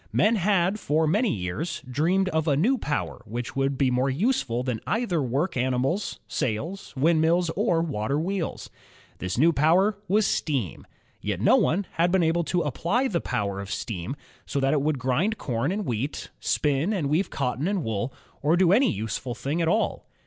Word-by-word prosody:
Men 220 Hz, +3 st, +3 dB
had, 195 Hz, +1 st, +2 dB
for 160 Hz, -2 st, +1 dB
many 210 Hz, +9 st, +2 dB
years, 100 Hz, -, -3 dB
dreamed 170 Hz, +9 st, +1 dB
of 160 Hz, -2 st, 0 dB
a 140 Hz, -3 st, +3 dB
new 240 Hz, -, +2 dB
power 145 Hz, -7 st, -3 dB
which 120 Hz, +1 st, -5 dB
would 135 Hz, 0 st, 0 dB
be 130 Hz, -2 st, +2 dB
more 130 Hz, +2 st, +1 dB
useful 135 Hz, -, 0 dB
than 125 Hz, -4 st, -2 dB
either 215 Hz, -8 st, 0 dB
work 135 Hz, +8 st, -1 dB
animals, 130 Hz, +9 st, 0 dB
sails, 165 Hz, -, -3 dB
windmills, 165 Hz, +3 st, +3 dB
or 175 Hz, -4 st, +1 dB
water 140 Hz, -2 st, -1 dB
wheels. 185 Hz, +1 st, -3 dB, 0.5 s
This 90 Hz, +2 st, -3 dB
new 165 Hz, +6 st, +5 dB
power 185 Hz, +8 st, +3 dB
was 210 Hz, +2 st, +3 dB
steam. 135 Hz, -, -1 dB, 0.3 s
Yet 100 Hz, -3 st, -2 dB
no 120 Hz, -, +5 dB
one 200 Hz, -5 st, +2 dB
had 170 Hz, +1 st, +1 dB
been 190 Hz, -2 st, +3 dB
able 165 Hz, +1 st, +2 dB
to 175 Hz, +1 st, 0 dB
apply 200 Hz, -, 0 dB
the 170 Hz, -4 st, -1 dB
power 100 Hz, -1 st, -2 dB
of 100 Hz, 0 st, -6 dB
steam 100 Hz, +1 st, -4 dB, 0.3 s
so 140 Hz, -, -1 dB
that 135 Hz, +1 st, +2 dB
it 150 Hz, -, +2 dB
would 150 Hz, 0 st, 0 dB
grind 135 Hz, -, 0 dB
corn 125 Hz, -, -1 dB
and 205 Hz, +1 st, -2 dB
wheat, 125 Hz, +5 st, -3 dB
spin 150 Hz, +7 st, +1 dB
and 170 Hz, -9 st, -1 dB
weave 160 Hz, +7 st, +1 dB
cotton 135 Hz, +3 st, -2 dB
and 195 Hz, -4 st, 0 dB
wool, 110 Hz, +2 st, -2 dB, 0.3 s
or 155 Hz, +4 st, +3 dB
do 180 Hz, -1 st, +4 dB
any 235 Hz, +2 st, +4 dB
useful 110 Hz, +2 st, -4 dB
thing 145 Hz, +7 st, -2 dB
at 165 Hz, -, +1 dB
all. 215 Hz, +7 st, 0 dB
155 Hz, 185 wpm, -26 LUFS, 125-185 Hz, 0.5 s, new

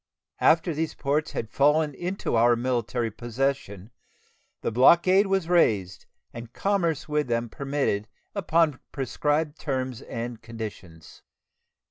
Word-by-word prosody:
After 165 Hz, +1 st, +3 dB
these 160 Hz, +1 st, -3 dB
ports 145 Hz, +2 st, -1 dB
had 110 Hz, -1 st, -4 dB
fallen 150 Hz, +2 st, +3 dB
into 180 Hz, 0 st, -3 dB
our 120 Hz, +1 st, +5 dB
military 120 Hz, -1 st, -1 dB
possession 120 Hz, -3 st, -3 dB, 0.7 s
the -, -, -2 dB
blockade 170 Hz, -, +5 dB
was 195 Hz, -3 st, 0 dB
raised 105 Hz, -, +1 dB, 0.3 s
and 115 Hz, 0 st, -9 dB
commerce 175 Hz, -7 st, 0 dB
with 150 Hz, -1 st, 0 dB
them 115 Hz, 0 st, -1 dB
permitted 135 Hz, -6 st, -2 dB, 0.3 s
upon 165 Hz, -7 st, +1 dB
prescribed 150 Hz, +3 st, -1 dB
terms 130 Hz, -3 st, -3 dB
and 115 Hz, -1 st, -6 dB
conditions. 105 Hz, -8 st, -9 dB
135 Hz, 115 wpm, -26 LUFS, 115-160 Hz, 0.7 s, our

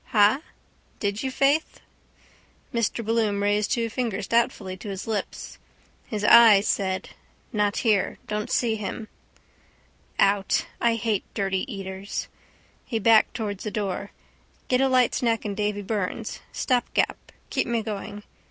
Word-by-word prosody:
Ha? 215 Hz, +5 st, +4 dB, 0.6 s
Did 205 Hz, 0 st, -1 dB
you, 265 Hz, -, -1 dB
faith? 280 Hz, +4 st, +1 dB, 0.9 s
Mr 230 Hz, -1 st, -1 dB
Bloom 215 Hz, -3 st, +1 dB
raised 205 Hz, 0 st, +1 dB
two 235 Hz, -3 st, +1 dB
fingers 230 Hz, -3 st, -2 dB
doubtfully 210 Hz, -5 st, 0 dB
to 205 Hz, -, -8 dB
his 195 Hz, -1 st, -5 dB
lips. 220 Hz, -2 st, -4 dB, 0.5 s
His 210 Hz, -2 st, -4 dB
eyes 215 Hz, -2 st, +8 dB
said: 190 Hz, -2 st, -1 dB, 0.4 s
—Not 210 Hz, -1 st, +1 dB
here. 210 Hz, -4 st, +2 dB
Don't 210 Hz, 0 st, -3 dB
see 225 Hz, -2 st, +1 dB
him. 215 Hz, +2 st, -5 dB, 1.1 s
Out. 195 Hz, 0 st, +2 dB, 0.2 s
I 235 Hz, -1 st, +3 dB
hate 220 Hz, -3 st, -1 dB
dirty 195 Hz, +5 st, -1 dB
eaters. 195 Hz, -1 st, -5 dB, 0.6 s
He 230 Hz, -, -3 dB
backed 220 Hz, 0 st, +4 dB
towards 205 Hz, -4 st, -4 dB
the 215 Hz, -, -2 dB
door. 200 Hz, -1 st, -3 dB, 0.6 s
Get 255 Hz, 0 st, +3 dB
a 270 Hz, -, +3 dB
light 255 Hz, -2 st, +3 dB
snack 230 Hz, -3 st, 0 dB
in 205 Hz, -, -2 dB
Davy 205 Hz, 0 st, -2 dB
Byrne's. 200 Hz, -2 st, -3 dB
Stopgap. 250 Hz, -2 st, 0 dB, 0.2 s
Keep -, -, 0 dB
me 235 Hz, -2 st, 0 dB
going. 205 Hz, 0 st, -6 dB
210 Hz, 135 wpm, -25 LUFS, 200-230 Hz, 1.1 s, eyes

